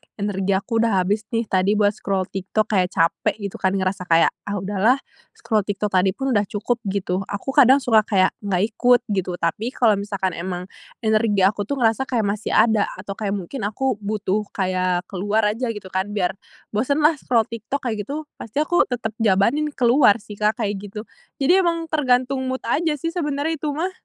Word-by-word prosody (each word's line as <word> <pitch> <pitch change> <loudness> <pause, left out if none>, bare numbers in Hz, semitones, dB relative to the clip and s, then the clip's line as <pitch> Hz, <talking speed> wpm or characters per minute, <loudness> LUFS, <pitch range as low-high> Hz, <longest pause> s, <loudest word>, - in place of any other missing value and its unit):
energi 200 -1 -1
aku 225 +4 -1
udah 215 -5 +2
habis 205 +3 -1
nih 230 - +1
tadi 195 0 +1
buat 205 -1 +3
scroll 195 -2 -2
TikTok, 205 +3 -2
kayak 185 -3 +3
capek 165 0 +1
gitu 200 -3 -7
kan, 190 +1 +1
ngerasa 185 -1 -2
kayak, 165 0 +4 0.2
“Ah 205 - -2
udahlah, 205 +6 +2 0.4
scroll 220 -2 0
TikTok 205 0 -2
tadi 185 0 +2
pun 270 -1 -2
udah 205 -3 +2
cukup,” 220 +4 -2
gitu. 190 -1 -1
Aku 205 +6 -4
kadang 270 0 +5
suka 225 -3 +5
kayak 190 -3 +3
nggak 195 -3 0
ikut 245 +2 +4
gitu. 185 -2 -1
Tapi 215 +9 -2
kalau 215 -5 +3
misalkan 200 -2 -2
emang 180 +2 -5 0.3
energi 215 -3 +2
aku 205 +1 +2
tuh 280 - -1
ngerasa 245 +1 +1
kayak 235 -4 0
masih 215 +1 -3
ada, 220 -2 +4
atau 200 - -8
kayak 200 0 -2
mungkin 200 +4 -4
aku 220 +1 -2
butuh 210 0 -2
kayak 185 -2 0
keluar 205 +3 0
aja 240 +4 -3
gitu 190 -3 -9
kan 190 +2 -1
biar 180 -3 +1 0.4
bosenlah, 290 +7 +2
scroll 230 -3 +2
TikTok, 230 +5 -5
kayak 220 -4 -3
gitu, 300 +3 -4 0.2
pasti 255 +7 -1
aku 350 +3 +2
tetap 235 -3 -3
jabanin 225 +8 +2
keluar 245 -3 +5
sih, 210 -3 -11
Kak, 215 +2 +1
kayak 205 -1 -2
gitu. 205 +1 -7 0.4
Jadi 360 +7 +5
emang 335 -3 -1
tergantung 260 -2 +1
mood 260 0 -3
aja 305 +5 0
sih 330 +4 -3
sebenarnya 305 -2 -2
itu 310 - -3
mah. 350 +5 -1
215 Hz, 190 wpm, -22 LUFS, 195-250 Hz, 0.4 s, kadang